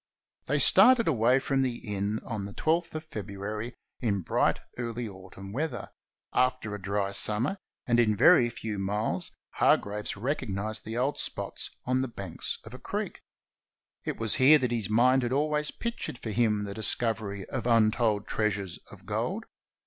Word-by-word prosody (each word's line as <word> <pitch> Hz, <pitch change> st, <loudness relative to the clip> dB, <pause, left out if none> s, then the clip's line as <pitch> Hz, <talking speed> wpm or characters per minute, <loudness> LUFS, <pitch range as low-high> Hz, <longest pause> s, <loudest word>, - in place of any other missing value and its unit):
They 145 Hz, -, +1 dB
started 230 Hz, -, +7 dB
away 125 Hz, -3 st, +4 dB
from 135 Hz, 0 st, 0 dB
the 125 Hz, -2 st, 0 dB
inn 105 Hz, -1 st, -3 dB
on 105 Hz, -4 st, -4 dB
the 100 Hz, -, -8 dB
12 165 Hz, +7 st, +1 dB
th -, -, -16 dB
of 155 Hz, 0 st, -6 dB
Febru 100 Hz, -1 st, -6 dB
ary, 110 Hz, +3 st, -4 dB, 0.2 s
in 100 Hz, -5 st, 0 dB
bright, -, -, +1 dB, 0.2 s
early 120 Hz, -1 st, -3 dB
autumn 95 Hz, 0 st, -10 dB
weather, 155 Hz, +6 st, -3 dB, 0.4 s
after 125 Hz, -4 st, +1 dB
a 105 Hz, -, -6 dB
dry 100 Hz, +1 st, -1 dB
sum 105 Hz, +2 st, +4 dB
mer, 170 Hz, +10 st, -1 dB, 0.3 s
and 120 Hz, -1 st, +2 dB
in 110 Hz, -3 st, +4 dB
a -, -, -5 dB
very 120 Hz, +3 st, +6 dB
few 110 Hz, -3 st, -5 dB
miles 95 Hz, -2 st, -1 dB, 0.3 s
Hargraves 105 Hz, 0 st, +1 dB
recognized 110 Hz, -4 st, -3 dB
the 110 Hz, +2 st, -4 dB
old 135 Hz, +4 st, 0 dB
spots -, -, -4 dB, 0.2 s
on 130 Hz, +1 st, +1 dB
the 130 Hz, -, -1 dB
banks 100 Hz, -7 st, -5 dB
of -, -, -11 dB
a -, -, -9 dB
creek. -, -, -4 dB, 0.8 s
It -, -, -3 dB
was 110 Hz, -2 st, +1 dB
here 145 Hz, +4 st, +8 dB
that 125 Hz, -4 st, -1 dB
his 115 Hz, -4 st, -1 dB
mind 125 Hz, +4 st, +4 dB
had 120 Hz, -1 st, -2 dB
always 150 Hz, +1 st, +1 dB
pictured 235 Hz, -, -4 dB
for 115 Hz, -, -5 dB
him 105 Hz, -1 st, +1 dB
the 100 Hz, -1 st, -5 dB
discovery 110 Hz, -2 st, -1 dB
of 125 Hz, -2 st, -3 dB
untold 110 Hz, -2 st, +3 dB
treasures 100 Hz, -4 st, -2 dB
of -, -, -14 dB
gold. -, -, -2 dB
115 Hz, 175 wpm, -28 LUFS, 105-130 Hz, 0.8 s, here